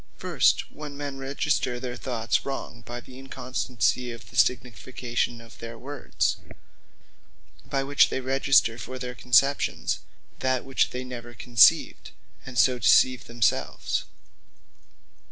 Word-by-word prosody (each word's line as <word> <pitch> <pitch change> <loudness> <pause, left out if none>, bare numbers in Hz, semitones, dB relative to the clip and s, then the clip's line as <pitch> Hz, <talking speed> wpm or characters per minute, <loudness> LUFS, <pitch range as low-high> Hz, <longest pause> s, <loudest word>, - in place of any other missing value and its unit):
First, - - +1
when 150 -2 -9
men 140 -1 -5
register 135 -2 -1
their 125 -1 -5
thoughts 120 -2 -1
wrong, 135 -4 -6
by 120 0 -6
the 130 +1 -13
inconstancy 125 -3 -2
of 115 -2 -11
the - - -13
signification 120 -1 0
of 115 0 -15
their 115 0 -8
words; 140 +3 -2 1.3
by 135 -1 0
which 140 +1 +4
they - - -2
register 135 -3 +2
for 130 +3 -7
their 125 -1 -5
conceptions, 125 +4 +2 0.4
that 130 -1 0
which 135 -1 +1
they 125 +1 -5
never 120 -1 -8
conceived; 120 0 +4 0.4
and 125 -2 -7
so 125 +1 +4
deceive 130 +1 +4
themselves. 115 -2 -1
125 Hz, 125 wpm, -26 LUFS, 120-135 Hz, 1.3 s, which